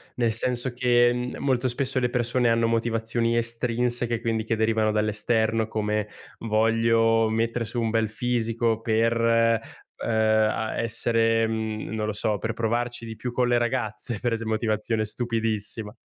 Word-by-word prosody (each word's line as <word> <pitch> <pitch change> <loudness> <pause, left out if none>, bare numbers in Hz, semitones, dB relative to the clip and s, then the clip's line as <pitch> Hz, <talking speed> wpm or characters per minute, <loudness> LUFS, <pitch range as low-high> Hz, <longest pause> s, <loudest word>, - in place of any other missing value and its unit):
Nel 120 -2 +1
senso 120 +2 -2
che, 125 0 +2
molto 130 -2 0
spesso 130 +1 -1
le 125 -1 0
persone 120 0 +1
hanno 115 0 +2
motivazioni 115 0 0
estrinseche 120 0 0
quindi 115 -2 -1
che 115 - 0
derivano 110 0 +1
dall'esterno 110 +1 +1
come: 105 -1 -1 0.3
"Voglio 115 0 +2
mettere 115 +1 -1
su 120 +2 -3
un 115 - 0
bel 110 0 +1
fisico 115 0 0
per, 115 0 +1
uhm, 115 -1 0
a 110 0 +1
essere, 115 0 +1
mhmm, 110 -1 -3
non 110 -1 -2
lo 110 - -2
so, 105 0 -1
per 115 +2 -3
provarci 120 +1 -2
di 110 -1 -8
più 120 +2 -5
con 125 0 +1
le 120 - +3
ragazze", 120 -1 -2
per 120 - 0
ese 115 0 -3
motivazione 110 0 -1
stupidissima, 110 -2 -2
115 Hz, 150 wpm, -25 LUFS, 110-120 Hz, 0.3 s, le